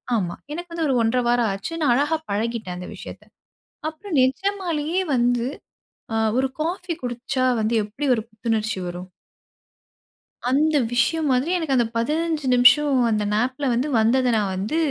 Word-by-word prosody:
ஆமா. 180 -6 -1 0.2
எனக்கு 345 +2 -7
வந்து 335 -1 -2
ஒரு 270 - +1
1-1/2 230 +2 +1 0.3
ஆச்சு. 195 +11 -5
நான் 250 -5 +4
அழகா 295 +4 +1 0.2
பழகிட்டேன் 215 -3 -2
அந்த 180 - -7
விஷயத்த. - - -10 0.7
அப்புறம் 330 +4 -7
நிஜமாலேயே 340 +3 0
வந்து, 240 -1 +2 0.7
அ - - 0 0.2
ஒரு 265 - +2
காஃபி 350 +2 -2
குடுச்சா 250 +2 -2 0.2
வந்து 220 +2 0
எப்பிடி 220 +8 -4
ஒரு 220 - -2
புத்துணர்ச்சி 220 -2 -2
வரும்? 175 +1 -6 1.4
அந்த 295 +5 +2 0.2
விஷயம்மாரி 265 +2 +1
எனக்கு 315 -6 -1
அந்த 240 -2 +3
15 305 +4 -1
நிமிஷம் 265 +3 +5
அந்த 215 -1 +1
நாப் 245 +5 0
ல - - +1
வந்து 245 +5 0
வந்தத 250 +3 +3
நான் 200 -3 0
வந்து 205 +11 -2
255 Hz, 145 wpm, -23 LUFS, 225-310 Hz, 1.4 s, நிமிஷம்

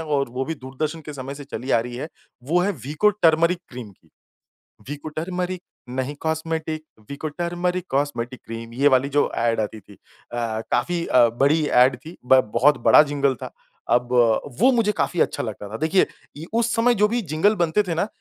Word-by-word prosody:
और 145 -4 -1
वो 130 +2 -3
भी 160 - -3
दूरदर्शन 145 +4 -5
के 150 - -6
समय 135 0 -6
से 145 0 -9
चली 135 -1 -6
आ 115 - +4
रही 120 +1 -6
है, 145 +5 -5 0.3
वो 165 +8 +1
है 195 - +1
वीको 155 +10 +2
टर्मेरिक 170 +2 +4
क्रीम 120 -4 -9
की। 95 - -26 0.8
वीको 145 +2 -6
टर्मेरिक, 180 +3 -4 0.3
नहीं 130 +3 -3
कॉस्मेटिक, 160 0 -2 0.3
वीको 140 +2 -5
टर्मेरिक 175 +3 -2
कॉस्मेटिक 135 -3 -2
क्रीम, 115 0 -8
ये 140 +4 +3
वाली 135 0 +3
जो 145 +1 +2
एड 115 -1 +1
आती 110 0 -3
थी 105 - -17
अ, - - -19 0.7
काफ़ी 170 +8 0
अ, 120 -2 +5
बड़ी 150 +3 +3 0.2
एड 130 +1 +2
थी, 165 +3 -10
ब 130 +1 +6
बहुत 140 +5 +4
बड़ा - - +9
जिंगल 140 -2 0
था। - - -7 0.4
अब 125 0 +2 0.5
वो 255 +5 +6
मुझे 230 -4 +2
काफ़ी 175 - -1
अच्छा - - 0
लगता 105 -2 -6
था, 110 - -5
देखिए 160 +8 +3 0.3
इ 160 - -7
उस 230 0 +1
समय 240 +2 +3
जो 210 - +6
भी 235 +3 -1
जिंगल 180 +4 +1
बनते 175 +2 +1
थे 170 - -1
ना, 175 - 0
150 Hz, 195 wpm, -23 LUFS, 130-170 Hz, 0.8 s, बड़ा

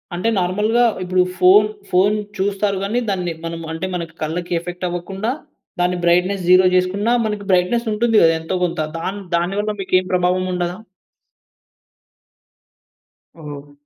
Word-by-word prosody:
అంటే 180 +6 0
నార్మల్‌గా 210 +7 +1 0.2
ఇప్పుడు 185 0 +2 0.2
ఫోన్, 200 +4 +6 0.2
ఫోన్ 195 +4 +3 0.2
చూస్తారు 200 +1 0
గాని, 220 +5 0
దాన్ని 180 -3 -1
మనం 165 0 -4
అంటే 165 +3 -4
మన 175 -1 -2 0.2
కళ్ళకి 175 +3 -3
ఎఫెక్ట్ 175 +1 -6
అవ్వకుండా, 190 +6 -3 0.5
దాని 180 0 +1
బ్రైట్‌నెస్ 180 +2 +2
జీరో 185 0 +7
చేసుకున్నా 195 +5 +1
మనకి 210 -2 -3
బ్రైట్‌నెస్ 185 +7 +2
ఉంటుంది 225 +1 +1
కదా! 165 0 +5
ఎంతో 165 +3 -3
కొంత. 175 -1 -1 0.2
దాన్ 195 +4 -4 0.2
దాని 175 +3 -1
వల్ల 215 +1 -1
మీకేం 185 -1 +1
ప్రభావముండదా? 180 0 0 2.6
ఓహ్! 145 -2 -9
185 Hz, 130 wpm, -19 LUFS, 175-200 Hz, 2.6 s, జీరో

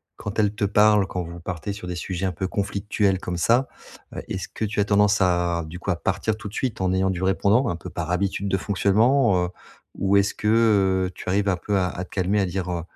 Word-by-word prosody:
quand 100 +2 -5
elle 105 -1 +2
te 105 - 0
parle, 105 0 +4
quand 90 - -3
vous 85 +1 -9
partez 85 +2 -5
sur 100 -3 -8
des 90 - -4
sujets 90 +2 -3
un 95 - 0
peu 95 +3 -3
conflictuels 100 0 -1
comme 90 -2 -4
ça, 120 +8 +3 0.5
heu, - - -4
est-ce - - -4
que 110 - -4
tu 105 0 -3
as 100 - +3
tendance 105 0 +3
à, 85 -2 +1
du 80 +3 -8
coup, 100 - -2
à - - +1
partir 105 +5 -1
tout 110 - -8
de - - -16
suite 125 -7 -2
en 95 - +1
ayant 95 0 +1
du 90 - -4
répondant, 100 +6 +2
un - - -1
peu 85 - -8
par 85 -1 -4
habitude 100 +2 -1
de 95 - +1
fonctionnement? 100 +1 +2
Heu, 90 - -4 0.5
ou 100 +1 +2
est-ce 100 0 +2
que, 105 - -4 0.6
heu, - - -12
tu - - -7
arrives 100 +2 +1
un 90 - +1
peu 100 +3 -1
à 90 -1 +1
à 90 - -5
te - - -24
calmer, 95 +2 0
à 100 - +2
dire, 90 0 -3
heu: 85 -1 -2
95 Hz, 255 wpm, -24 LUFS, 90-105 Hz, 0.6 s, parle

